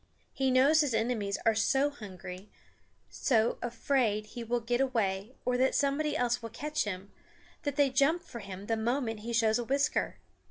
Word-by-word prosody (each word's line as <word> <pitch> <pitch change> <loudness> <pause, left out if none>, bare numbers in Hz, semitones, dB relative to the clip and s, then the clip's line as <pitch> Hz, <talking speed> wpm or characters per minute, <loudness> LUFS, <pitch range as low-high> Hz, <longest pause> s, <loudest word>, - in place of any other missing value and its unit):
He 270 -1 +1
knows 275 +5 +5
his 275 -6 0
enemies 220 -3 0
are 225 - +5
so 270 +6 +2
hungry, 190 -5 -9 0.6
so 230 -3 +1
afraid 235 -3 0
he 235 +2 -7
will 240 +1 0
get 240 +2 0
away 220 -3 -1
or 250 0 +1
that 260 +1 +3
somebody 285 +2 +1
else 245 0 +1
will 230 - -6
catch 300 +6 -2
him, 195 0 -5 0.5
that 285 -3 -2
they 285 -2 +3
jump 295 +6 +3
for 245 -8 -9
him 195 -1 -8
the 225 +1 0
moment 230 -1 -1
he 230 +3 -6
shows 225 0 +3
a - - -1
whisker. 275 +4 0
240 Hz, 175 wpm, -30 LUFS, 220-270 Hz, 0.6 s, knows